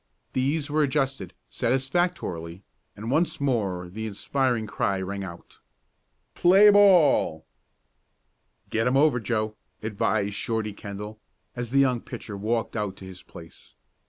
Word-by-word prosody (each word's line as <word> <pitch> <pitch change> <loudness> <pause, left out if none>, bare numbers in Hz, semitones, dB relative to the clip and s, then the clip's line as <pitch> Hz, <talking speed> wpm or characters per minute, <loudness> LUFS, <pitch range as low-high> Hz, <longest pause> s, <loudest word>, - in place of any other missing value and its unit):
These 140 +3 0
were 155 +1 +2
adjusted 135 - 0 0.2
satisfactorily, 130 - -1 0.3
and 110 +4 -5
once 165 +5 +1
more 100 -10 -1
the 110 +5 -6
inspiring 120 +2 -1
cry 100 -2 -1
rang 100 +1 -4
out: 85 -2 -11 0.7
"Play 195 +4 +6
ball!" 175 - +5 1.3
"Get 115 +2 +1
'em 130 +2 +3
over, 140 -3 +4
Joe," 110 -2 -2 0.3
advised 105 -1 0
Shorty 110 0 -2
Kendall, 105 +2 -8 0.4
as 120 -1 -4
the 135 - 0
young 130 -4 +3
pitcher 105 - -8
walked 110 +4 -2
out 105 -4 -2
to 95 - -11
his 95 -1 -10
place. 80 -1 -14
115 Hz, 130 wpm, -26 LUFS, 100-135 Hz, 1.3 s, Play